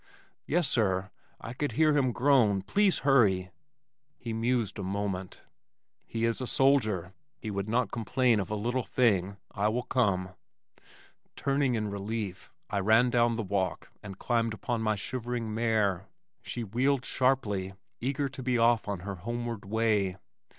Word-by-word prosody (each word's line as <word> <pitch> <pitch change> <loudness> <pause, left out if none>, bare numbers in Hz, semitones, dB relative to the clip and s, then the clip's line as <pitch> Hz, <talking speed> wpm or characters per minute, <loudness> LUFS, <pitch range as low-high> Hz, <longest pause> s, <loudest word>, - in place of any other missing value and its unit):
"Yes, 170 0 +2
sir. 95 -3 0 0.3
I 115 - -7
could 145 +3 -2
hear 155 -1 +3
him 130 -3 +2
groan. 120 -7 +3
Please 195 - +2
hurry." 100 -10 +3 0.7
He 115 -2 -5
mused 115 -2 0
a - - -3
moment. 95 -1 -4 0.6
"He 115 0 -1
is 115 +2 0
a 130 - -3
soldier. 110 -11 +2 0.2
He 110 - -6
would 100 +1 -3
not 120 -1 +1
complain 120 0 +2
of 95 - -3
a 105 - -1
little 120 +5 -1
thing 100 -6 +1
I 100 +1 0
will 120 +3 0
come." 95 -9 +1 1.1
Turning 135 -2 +1
in 105 -2 -2
relief, 100 -1 -4 0.2
I 100 - -1
ran 110 +5 +4
down 120 -1 +3
the 115 - -2
walk 95 -3 -2
and 95 -2 -9
climbed 115 -1 0
upon 115 +1 -2
my 110 -1 +1
shivering 120 +1 -4
mare. 105 -5 +1 0.3
She 120 - -4
wheeled 130 +5 0
sharply, 105 -8 0 0.2
eager 140 +3 -1
to 135 0 -8
be 125 -1 +1
off 115 -1 +3
on 100 -4 -3
her 100 +1 -5
homeward 120 +2 -4
way. 105 -3 +1
115 Hz, 155 wpm, -29 LUFS, 100-125 Hz, 1.1 s, ran